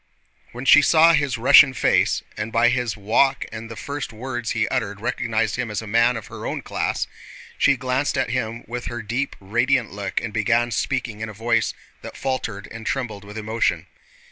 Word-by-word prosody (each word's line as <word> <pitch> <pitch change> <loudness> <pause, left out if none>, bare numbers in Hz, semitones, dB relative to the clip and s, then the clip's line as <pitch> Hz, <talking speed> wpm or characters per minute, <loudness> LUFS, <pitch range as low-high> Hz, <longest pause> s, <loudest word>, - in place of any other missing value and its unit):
When 125 +2 -8
she 150 - +8
saw 165 +2 +6
his 140 -5 +1
Russian 130 +2 +7
face, - - +2
and 110 +1 -4
by 115 +2 +4
his 120 -2 -1
walk 110 +7 +2
and 115 0 -7
the 115 - -7
first 145 +1 -5
words 120 +1 -5
he 110 -2 0
uttered 105 -6 -2
recognized 115 -2 -1
him 125 -3 -2
as 105 -2 -3
a 110 - -7
man 115 +3 +3
of 110 - -8
her - - -7
own - - -4
class, - - -2 0.5
she 140 -1 +3
glanced 130 +3 -1
at 130 -2 0
him 115 -2 -3
with 120 +1 -6
her 120 -2 -5
deep 120 +6 -2
radiant 120 +4 +1
look 100 -1 -3
and 115 -3 -6
began 120 +2 +1
speaking 120 -2 -2
in 110 - -4
a - - -8
voice 115 +2 0 0.3
that - - -9
faltered 115 -6 -3
and 115 -1 -8
trembled 115 -7 -3
with 105 +1 -10
emotion. 110 +1 -1
115 Hz, 195 wpm, -22 LUFS, 110-130 Hz, 0.5 s, she